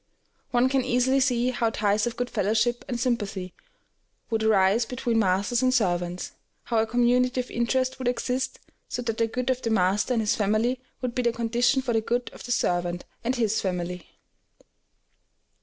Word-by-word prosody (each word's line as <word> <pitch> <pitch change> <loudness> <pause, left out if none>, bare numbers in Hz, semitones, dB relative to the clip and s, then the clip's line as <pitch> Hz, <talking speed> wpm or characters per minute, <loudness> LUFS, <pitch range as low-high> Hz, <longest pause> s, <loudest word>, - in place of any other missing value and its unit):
One 245 0 +3
can 265 0 +1
easily 255 +2 +2
see 250 -1 +2
how 235 -2 0
ties 210 0 +1
of 235 - -5
good 245 0 -2
fellowship 225 +3 +1
and 240 -2 -3
sympathy 205 -7 -2 0.8
would 225 -1 +1
arise 215 +1 +4
between 235 -1 -1
masters 200 +4 +1
and 255 0 +3
servants, 180 -6 0 0.3
how 230 -2 0
a 220 - +1
community 245 +2 +2
of 250 - -4
interest 255 +2 0
would 255 - -2
exist, 255 +1 -1 0.3
so 245 - -3
that 225 -2 -3
the 230 - +3
good 250 +3 -1
of 255 0 -2
the 230 - -2
master 205 +3 +2
and 225 - +2
his 210 - +1
family 215 +5 +1 0.2
would 250 -1 -1
be 250 - 0
the 240 -1 +2
condition 240 +3 +1
for 245 - -1
the 225 - +2
good 240 +2 -2
of - - -11
the 245 - -5
servant 175 -4 0 0.2
and 250 +2 0
his 220 -3 +1
family. 180 -2 -3
235 Hz, 180 wpm, -26 LUFS, 210-250 Hz, 0.8 s, arise